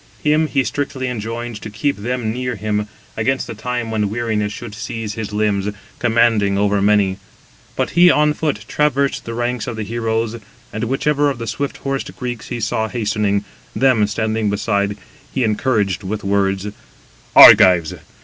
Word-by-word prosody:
Him 155 +1 +3
he 140 -3 +1
strictly 130 +2 -3
enjoined 115 -1 -5
to 105 - -7
keep 140 +7 -1
them 120 +1 -2
near 125 0 -3
him, 105 0 -2 0.3
against 130 +5 0
the - - -7
time 115 +1 -4
when 105 -2 0
weariness 110 -2 -1
should 115 -1 -8
seize 110 0 -5
his 110 -2 -5
limbs, 105 -1 0 0.3
commanding 115 -4 +2
over 100 0 +1
many. 100 -2 +2 0.6
But - - -1
he 175 +1 +6
on 150 -2 +3
foot 145 -10 -2
traversed 140 -2 0
the 115 - -5
ranks 120 +2 -2
of 120 - -4
the 110 - -4
heroes, 115 +1 -2 0.4
and 110 +2 -2
whichever 145 +3 +1
of 135 - -3
the 115 - -5
swift 140 +4 -3
horsed 135 -1 -4
Greeks 120 -3 -5
he 120 - -4
saw 110 0 -1
hastening, 105 -3 -1 0.3
them 125 -6 +3
standing 110 0 -1
beside, 100 0 -1 0.3
he 130 - -1
encouraged 105 -3 0
with 105 +2 -4
words: 100 0 0 0.7
"Argives! 85 -4 +8
110 Hz, 160 wpm, -19 LUFS, 105-125 Hz, 0.7 s, Argives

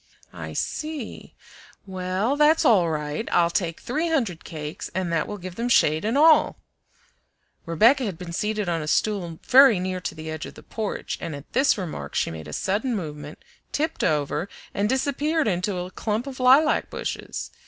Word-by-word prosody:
"I - - -7
see. 305 -7 -5 0.5
Well, 190 +6 -1
that's 300 +2 +4
all 190 -8 +5
right. 150 +5 -3
I'll 170 -1 +3
take 170 -3 -1
three 310 +8 -2
hundred 230 - -1
cakes, 155 -1 -6
and 180 -2 -1
that 165 -2 0
will 205 - -5
give 180 -1 -8
them 235 +1 -1
shade 155 -9 +3
and 225 +5 0
all." 315 +1 +5 1.1
Rebecca 230 - +4
had 195 -6 -4
been 175 -1 -7
seated 210 +2 -1
on 165 -2 0
a 150 - -5
stool 175 -1 0
very 265 -4 +7
near 185 0 -3
to - - -4
the 155 0 -6
edge 155 0 -5
of - - -12
the - - -13
porch, 220 -2 -4
and 160 - -4
at 140 +1 -12
this 270 0 +3
remark 180 -5 -6
she - - 0
made 80 -2 -8
a - - -8
sudden 220 - -1
movement, 150 -5 -7 0.3
tipped 315 +2 -1
over, 150 +4 0 0.2
and 205 +1 0
disappeared 285 +3 0
into 185 0 -1
a 180 +1 -5
clump 215 +5 -2
of 270 -2 -8
lilac 265 +5 +4
bushes. - - -5
195 Hz, 180 wpm, -24 LUFS, 165-255 Hz, 1.1 s, very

